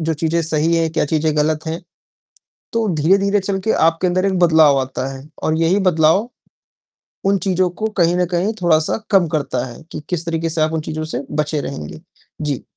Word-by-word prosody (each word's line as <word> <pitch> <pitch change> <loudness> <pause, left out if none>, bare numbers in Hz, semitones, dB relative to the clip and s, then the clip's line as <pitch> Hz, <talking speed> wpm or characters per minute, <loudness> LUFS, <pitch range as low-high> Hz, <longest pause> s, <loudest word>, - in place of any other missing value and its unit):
जो 160 0 -1
चीजें 165 +2 0
सही 160 +1 +1
हैं, 165 -1 +1
क्या 160 - +1
चीजें 155 0 0
ग़लत 155 +1 0
हैं, 160 +2 -3 0.9
तो 230 -1 0
धीरे-धीरे 195 +6 +2
चल 195 0 -2
के 220 - +2
आपके 165 +3 +2
अंदर 185 +2 +1
एक 190 -2 0
बदलाव 160 -5 +5
आता 130 0 -4
है 135 +2 -11 0.2
और 155 - +1
यही 165 +4 +2
बदलाव 165 +7 +3 1.0
उन 195 0 +3
चीज़ों 185 -1 +2
को 215 +5 -3
कहीं 175 -1 +3
न 180 - +2
कहीं 185 +6 0
थोड़ा-सा 160 -3 +2
कम 190 -4 +4
करता 145 -5 -2
है 120 +2 -10
कि - - -5
किस 175 -2 -2
तरीक़े 165 0 -1
से 160 0 -1
आप 155 +1 +1
उन 160 - -1
चीज़ों 155 0 -4
से - - -2
बचे 150 0 -1
रहेंगे। 75 - -7 0.4
जी। 145 -4 -2
160 Hz, 195 wpm, -19 LUFS, 155-180 Hz, 1.0 s, बदलाव